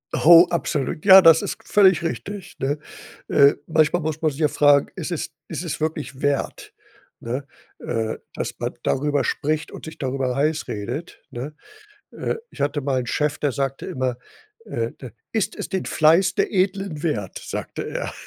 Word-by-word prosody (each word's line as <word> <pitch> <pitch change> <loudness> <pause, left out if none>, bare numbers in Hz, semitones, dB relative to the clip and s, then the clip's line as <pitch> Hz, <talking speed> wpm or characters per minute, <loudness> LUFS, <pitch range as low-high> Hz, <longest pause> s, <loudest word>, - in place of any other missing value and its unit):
Oh, 170 +2 +8
absolut. 155 -2 -2
Ja, 190 -1 +10
das 165 -2 +7
ist - - -4
völlig 190 -6 +4
richtig, 195 +4 -5
ne? 145 +2 -1 0.5
Äh, 140 -1 +6
manchmal 160 +2 +2
muss 155 0 -3
man 160 - +3
sich 140 +3 -8
ja 150 - +4
fragen: 145 -1 +4
„Ist 180 -1 -4
es 170 - -3 0.2
ist 165 +1 -5
es 170 - -4
wirklich 155 -3 -4
wert, 145 -1 -2 0.5
ne, 130 +4 -4 0.3
äh, 110 -2 -2 0.2
dass - - -4
man - - -3
darüber 145 +1 +1
spricht 155 +1 -1
und - - -9
sich 160 - -9
darüber 130 -1 -2
heiß 150 +3 0
redet“, 125 - -5
ne? 135 +6 -6 0.6
Äh, - - -3 0.2
ich - - -8
hatte 145 +1 0
mal 135 -1 0
'n 125 - -5
Chef, 150 +3 -1
der 145 - 0
sagte 135 0 -3
immer: 130 -2 -2 0.5
„Äh, - - -3
d - - -8 0.2
ist 220 -4 -1
es - - -5
den 190 +1 -3
Fleiß 170 +4 +3
der - - 0
Edlen 190 -4 0
wert?“, 110 - -2
sagte - - -5
er. - - -4
150 Hz, 175 wpm, -22 LUFS, 140-170 Hz, 0.6 s, Ja